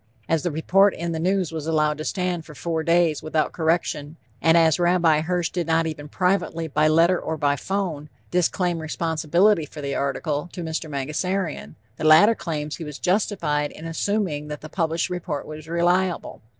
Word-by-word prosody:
As 165 -2 +1
the 175 - -1
report 190 +6 +3
in 170 0 -3
the 160 - -3
News 185 0 0
was 160 -1 -5
allowed 155 -1 +1
to - - -3
stand 180 -3 -2
for 150 -1 -13
four 165 0 -2
days 170 -1 +2
without 155 0 0
correction, 160 -2 -1 0.2
and 165 +1 +5
as 165 0 +4
Rabbi 175 -3 +3
Hirsch 175 +1 -1
did 175 -3 -2
not 165 0 +2
even 150 -2 -5
privately, 180 -2 0
by 155 +1 +2
letter 170 +3 +4
or 160 - -4
by 145 -1 +1
phone, 165 -3 -3 0.2
disclaim 180 -1 +1
responsibility 165 +3 +1
for 150 - -11
the 140 -1 -3
article, 145 +3 -2
to 175 - -5
Mr. 160 0 -4
Mangasarian, 150 - -3 0.2
the - - -6
latter 160 +8 +7
claims 155 -6 -4
he 170 - -6
was 150 -2 -7
justified 175 -7 0
in 160 - -11
assuming 165 -3 -1
that 150 -1 -6
the 155 - -9
published 165 +1 -1
report 170 -5 -4
was 155 0 -9
reliable. 175 +2 0
165 Hz, 180 wpm, -23 LUFS, 155-175 Hz, 0.2 s, latter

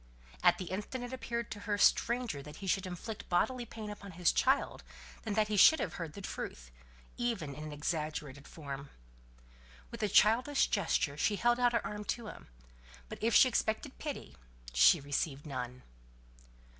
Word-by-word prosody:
At 175 - +5
the 185 - -5
instant 210 +6 -4
it 245 +1 -6
appeared 235 -2 -4
to 205 - -5
her 205 - +2
stranger 235 - +2
that 150 +2 -10
he 195 - -9
should 190 0 0
inflict 200 +4 -7
bodily 240 +7 +1
pain 215 -1 -7
upon 200 -2 -9
his 175 0 +3
child, 265 +2 +1 0.4
than 215 -3 -3
that 215 -1 +3
he 210 -1 -1
should 315 - +8
have - - -2
heard 160 -3 -5
the 200 - -8
truth 60 - -6 0.5
even 225 - -2
in 150 +3 -7
an 155 - -6
exaggerated 150 -2 -4
form. 140 -3 -7 1.0
With - - -7
a 210 - +1
childish 240 +8 +4
gesture 160 -7 +1
she 205 +7 +1
held 240 +4 +2
out 245 -1 +3
her 235 - 0
arm 210 0 -4
to 235 - -10
him; 210 - -10 0.6
but - - -8
if 230 0 +2
she - - +8
expected 240 +2 -1
pity, 295 -2 -6 0.4
she - - +6
received 140 +1 -2
none. 125 -3 -5
200 Hz, 175 wpm, -33 LUFS, 150-235 Hz, 1.0 s, should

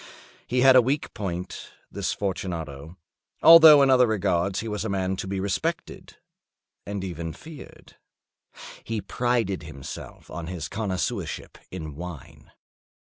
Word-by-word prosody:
He 125 +1 +1
had 130 0 +7
a 130 - +8
weak 135 +5 -2
point—this 90 -4 -5
Fortunato—although 95 - +4
in 135 - +4
other 125 -1 +5
regards 95 -3 0
he 115 - -6
was 105 -2 -3
a 110 - -3
man 95 -1 -1
to 95 - -5
be 95 0 -3
respected 95 0 -4 0.7
and 100 -1 -4
even 85 -3 -5
feared. 155 -2 -13 0.9
He 115 -1 -3
prided 115 -2 -1
himself 75 -5 -10
on 80 0 -6
his 85 -5 -5
connoisseurship 100 -2 -4
in 80 -5 -7
wine. 85 -3 -10
95 Hz, 125 wpm, -25 LUFS, 85-120 Hz, 0.9 s, a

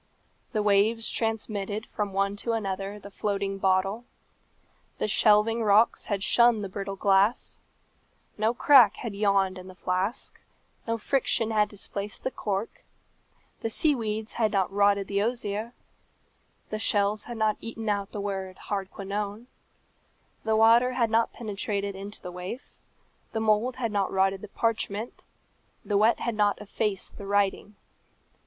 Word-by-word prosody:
The 215 -3 0
waves 210 +3 +3
transmitted 215 -2 -2
from 205 -1 -3
one 195 +1 0
to 230 +3 -2
another 195 -2 -3
the 200 0 -11
floating 195 -1 -2
bottle. 195 +4 +1 0.9
The - - -1
shelving 215 +2 +4
rocks 215 +2 +4
had 200 -2 -2
shunned 235 -2 +4
the 200 - -4
brittle 195 +1 -5
glass; 195 +3 +2 0.8
no 215 +1 +1
crack 245 -5 +6
had 230 -4 -6
yawned 195 -2 +1
in 185 - -11
the 185 - -11
flask; 185 +6 -2 0.5
no 230 0 0
friction 230 -2 0
had 210 -1 +2
displaced 205 0 -6
the 260 - -1
cork; 205 -1 -4 0.8
the 225 - -2
sea 300 +7 +2
weeds 220 -3 -3
had 220 -3 +1
not 195 -2 0
rotted 200 0 +3
the 200 0 0
osier; 220 -1 -2 1.0
the 215 - -2
shells 205 0 +1
had 240 -1 -7
not 215 -1 +1
eaten 225 -1 -6
out 200 -1 -1
the 210 - -5
word 190 -2 -4
"Hardquanonne;" 200 +2 -4 1.0
the 220 0 +1
water 230 +3 +5
had 235 -3 +1
not 225 +1 +2
penetrated 200 -2 -3
into 200 +2 -8
the 180 - -8
waif; 180 +9 -7 0.6
the 220 - -1
mould 220 +3 +2
had 240 -4 -2
not 200 -2 0
rotted 190 0 +1
the 210 - -8
parchment; 220 +1 -2 0.6
the 205 - -1
wet 220 +3 +3
had 230 -3 -2
hot 205 -1 +3
effaced 210 -1 -3
the 200 - -7
writing. 205 +1 0
210 Hz, 150 wpm, -27 LUFS, 200-225 Hz, 1.0 s, crack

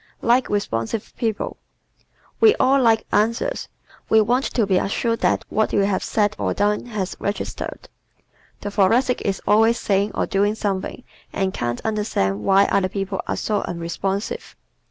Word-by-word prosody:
Likes 245 +2 +3
Responsive 200 - -2
People 220 -3 -2 0.4
¶ - - -35 0.4
We 435 -1 +6
all 270 +1 +3
like 225 -2 +3
answers. 230 - 0 0.4
We 220 - +6
want 245 +5 +2
to 230 - 0
be 190 -2 +2
assured 230 +3 -1
that - - +1
what 220 - 0
we 200 - +3
have 200 -2 0
said 210 -1 +1
or - - -1
done 210 +3 0
has 205 -5 -3
registered. 200 - -4 0.7
The 205 - -4
Thoracic 230 +6 +2
is 195 -1 -2
always 225 +3 +4
saying 200 +1 0
or - - +1
doing 205 +2 +1
something 200 +3 -3 0.3
and 190 -1 -1
can't 120 0 -3
understand 205 - -1
why 195 +1 +5
other 195 -2 +1
people 195 0 -3
are - - -1
so 210 -2 -1
unresponsive. 190 - -4
205 Hz, 155 wpm, -22 LUFS, 195-225 Hz, 0.7 s, We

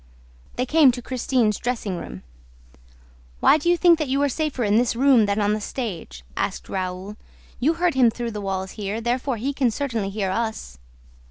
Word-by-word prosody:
They 250 - -1
came 300 -1 +5
to 245 - -6
Christine's 245 -4 0
dressing 230 -6 -2
room. 60 - -8 1.2
"Why 310 - +5
do 345 - 0
you 350 - +4
think 340 -2 +5
that 305 - -1
you 270 +2 0
are 285 - +2
safer 295 -2 -2
in 210 0 +3
this 240 0 +1
room 250 -4 +4
than 200 +1 0
on 205 0 +2
the 215 - -2
stage?" 185 - -6
asked - - -3
Raoul. 185 +2 -4 0.4
"You 300 +7 +2
heard 345 0 +1
him 255 -3 +5
through 235 +1 -4
the 210 -1 -5
walls 190 -1 -3
here, 210 +1 -4
therefore 245 +2 -1
he 270 +6 -2
can 265 -3 +1
certainly 230 -5 -2
hear 195 -2 -2
us." 220 - -4
235 Hz, 190 wpm, -23 LUFS, 205-265 Hz, 1.2 s, came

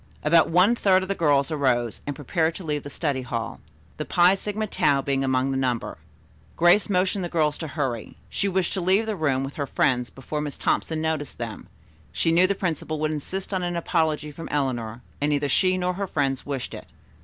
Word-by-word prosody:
About 160 +2 +5
one 180 +8 +5
third 190 -4 +3
of 190 - -7
the - - +2
girls 145 -4 +2
arose 125 -6 0
and 145 - -2
prepared 160 +4 0
to 190 - -7
leave 150 -2 -2
the 145 - -8
study 140 -2 -2
hall, 115 -2 -4 0.4
the - - -3
Phi 180 +1 +5
Sigma 210 +2 -2
Tau 145 -8 +2
being 135 0 0
among 130 0 +1
the 135 - -1
number. 125 -3 -2 0.6
Grace 175 +5 +5
motioned 185 0 +1
the 175 - -3
girls 155 -3 +1
to 160 - -4
hurry. 130 -6 -3
She 200 - -1
wished 190 -2 0
to 190 - -1
leave 190 +5 +3
the 220 -1 -2
room 140 -6 +1
with 135 +1 -6
her 145 -2 -2
friends 125 -2 +1
before 150 +3 -5
Miss 145 -1 -4
Thompson 160 -1 0
noticed 155 -3 -2
them. 115 -2 -6 0.4
She 165 - +1
knew 175 +3 +5
the 200 - 0
principal 160 -4 -2
would 155 0 0
insist 185 +7 -4
on 185 - 0
an 175 -1 -2
apology 160 -3 0
from 165 +3 -8
Eleanor, 120 -5 -2 0.2
and 145 - +2
neither 145 -1 +1
she 185 +6 +2
nor 180 0 0
her 195 +2 -3
friends 135 -5 -1
wished 140 -3 -4
it. - - -9
155 Hz, 210 wpm, -25 LUFS, 135-180 Hz, 0.6 s, About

